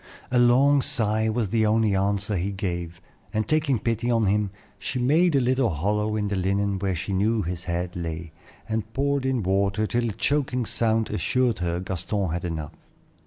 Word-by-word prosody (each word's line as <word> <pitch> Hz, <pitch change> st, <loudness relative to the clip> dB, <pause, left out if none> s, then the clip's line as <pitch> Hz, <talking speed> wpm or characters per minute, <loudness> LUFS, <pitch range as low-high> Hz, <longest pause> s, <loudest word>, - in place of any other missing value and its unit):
A 125 Hz, -, +3 dB
long 135 Hz, +4 st, +5 dB
sigh 110 Hz, -6 st, +1 dB
was 110 Hz, -2 st, -1 dB
the 110 Hz, +1 st, +2 dB
only 110 Hz, -2 st, +2 dB
answer 100 Hz, +1 st, 0 dB
he 95 Hz, +3 st, -1 dB
gave, 85 Hz, -3 st, -4 dB, 0.3 s
and 110 Hz, -1 st, -1 dB
taking 155 Hz, -4 st, +2 dB
pity 115 Hz, +2 st, -1 dB
on 115 Hz, -2 st, +2 dB
him, 105 Hz, +1 st, +1 dB, 0.3 s
she 125 Hz, -, -3 dB
made 155 Hz, +7 st, +3 dB
a -, -, +5 dB
little 130 Hz, -1 st, +2 dB
hollow 105 Hz, +6 st, 0 dB
in 105 Hz, -1 st, -1 dB
the 100 Hz, -, -1 dB
linen 100 Hz, +1 st, 0 dB
where 95 Hz, -1 st, -1 dB
she 90 Hz, +4 st, -4 dB
knew 105 Hz, +3 st, +1 dB
his 90 Hz, +1 st, -5 dB
head 85 Hz, 0 st, -3 dB
lay, 85 Hz, -1 st, -5 dB, 0.4 s
and 110 Hz, 0 st, -3 dB
poured 140 Hz, 0 st, 0 dB
in 130 Hz, -4 st, 0 dB
water 100 Hz, +3 st, +1 dB
till 120 Hz, +1 st, 0 dB
a -, -, -4 dB
choking 130 Hz, +1 st, 0 dB
sound 110 Hz, 0 st, 0 dB
assured 125 Hz, +2 st, +1 dB
her 85 Hz, -1 st, -1 dB
Gaston 95 Hz, 0 st, -2 dB
had 85 Hz, +1 st, -3 dB
enough. 80 Hz, -4 st, -4 dB
105 Hz, 185 wpm, -25 LUFS, 95-120 Hz, 0.4 s, long